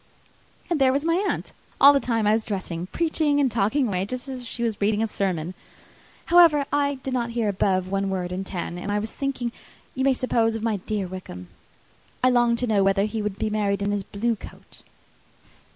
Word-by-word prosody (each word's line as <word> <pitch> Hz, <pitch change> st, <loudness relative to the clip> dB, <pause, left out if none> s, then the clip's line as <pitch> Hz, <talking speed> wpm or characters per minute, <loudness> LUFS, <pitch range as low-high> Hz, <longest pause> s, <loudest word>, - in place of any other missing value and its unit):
And 330 Hz, -5 st, -1 dB
there 260 Hz, -1 st, +5 dB
was 280 Hz, +3 st, -1 dB
my 335 Hz, +4 st, +2 dB
aunt, -, -, -3 dB, 0.3 s
all 285 Hz, +1 st, +9 dB
the 280 Hz, -, +3 dB
time 230 Hz, -5 st, 0 dB
I 210 Hz, -, +4 dB
was 220 Hz, 0 st, -1 dB
dressing, 180 Hz, -4 st, -4 dB
preaching 310 Hz, -, +1 dB
and 270 Hz, -3 st, +2 dB
talking 235 Hz, +5 st, +1 dB
away 185 Hz, -3 st, -1 dB
just 255 Hz, +6 st, -5 dB
as 260 Hz, -2 st, -5 dB
if 245 Hz, -, -9 dB
she 235 Hz, -, -4 dB
was 225 Hz, -3 st, -2 dB
reading 210 Hz, +2 st, +2 dB
a -, -, 0 dB
sermon. 185 Hz, -5 st, -2 dB, 0.7 s
However, 335 Hz, -5 st, +6 dB
I 285 Hz, -1 st, +2 dB
did 265 Hz, -, -3 dB
not 240 Hz, -2 st, -1 dB
hear 225 Hz, -2 st, +1 dB
above 190 Hz, -2 st, +1 dB
one 195 Hz, +1 st, -1 dB
word 180 Hz, -2 st, -3 dB
in 185 Hz, +1 st, -3 dB
ten, 175 Hz, -2 st, -5 dB
for 205 Hz, -, -3 dB
I 205 Hz, -, +1 dB
was 215 Hz, +1 st, -3 dB
thinking, 265 Hz, -4 st, -3 dB, 0.4 s
you 260 Hz, -, -2 dB
may 270 Hz, -1 st, +3 dB
suppose, 230 Hz, -3 st, +1 dB
of 225 Hz, -, -5 dB
my 225 Hz, -2 st, 0 dB
dear 200 Hz, +1 st, -3 dB
Wickham. 175 Hz, -, -8 dB, 0.7 s
I 255 Hz, -, +5 dB
longed 240 Hz, -1 st, +3 dB
to 250 Hz, -, 0 dB
know 205 Hz, -3 st, +3 dB
whether 195 Hz, 0 st, +3 dB
he 215 Hz, +1 st, -3 dB
would 205 Hz, -2 st, -3 dB
be 215 Hz, -, -2 dB
married 200 Hz, -2 st, 0 dB
in 200 Hz, -, 0 dB
his 205 Hz, -1 st, -1 dB
blue 225 Hz, +4 st, -1 dB
coat. -, -, -13 dB
220 Hz, 215 wpm, -24 LUFS, 195-255 Hz, 0.7 s, all